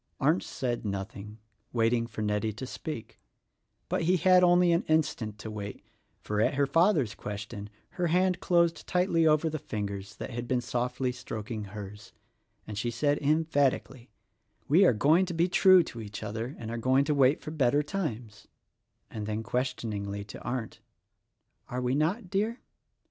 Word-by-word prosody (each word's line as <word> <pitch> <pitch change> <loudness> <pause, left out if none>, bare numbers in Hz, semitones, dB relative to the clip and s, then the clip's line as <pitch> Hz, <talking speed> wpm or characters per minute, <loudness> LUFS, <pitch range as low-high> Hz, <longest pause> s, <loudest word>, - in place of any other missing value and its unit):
Arndt 155 +6 +3
said 120 -2 -3
nothing, 100 +1 -5 0.3
waiting 115 0 +1
for 110 -1 -5
Nettie 105 +1 0
to 115 +6 -6
speak; 130 -2 -7 0.7
but - - -1
he 180 +3 +3
had 180 +2 +5
only 175 0 +5
an 170 +1 +3
instant 125 -9 0
to 110 0 -7
wait, 100 -1 -7 0.4
for 105 0 -1
at 125 - +2
her 140 +1 +3
father's 155 - +3
question 105 0 -6 0.2
her 180 -1 -1
hand 180 +2 +2
dosed 170 -2 +2
tightly 180 -3 +2
over 155 +1 +3
the 155 -1 -2
fingers 100 -3 -5
that - - -6
had 120 0 -5
been 125 0 +1
softly 125 +1 -1
stroking 115 -3 -6
kers, 105 +1 -9 0.5
and 105 -1 -5
she 120 - -1
said 145 +5 +1
emphatically, 145 -4 0 0.6
"We 175 +7 +6
are 130 - +5
going 155 - +3
to 175 - -4
be 170 +2 +3
true 185 0 +6
to 115 - -8
each 105 0 -7
other 110 +5 -4
and 115 -1 -6
are 115 - -3
going 130 +4 +3
to 150 - +1
wait 140 +1 +4
for 155 - -7
better 145 -1 +2
times," 125 - -5 0.6
and 105 -2 -5
then 110 +1 -2
questioningly 110 -5 -3
to 105 - -10
Arndt, 120 -3 -4 0.9
"Are 125 - -3
we 125 0 0
not, 175 - 0
dear?" 215 +5 0
125 Hz, 165 wpm, -29 LUFS, 110-160 Hz, 0.9 s, We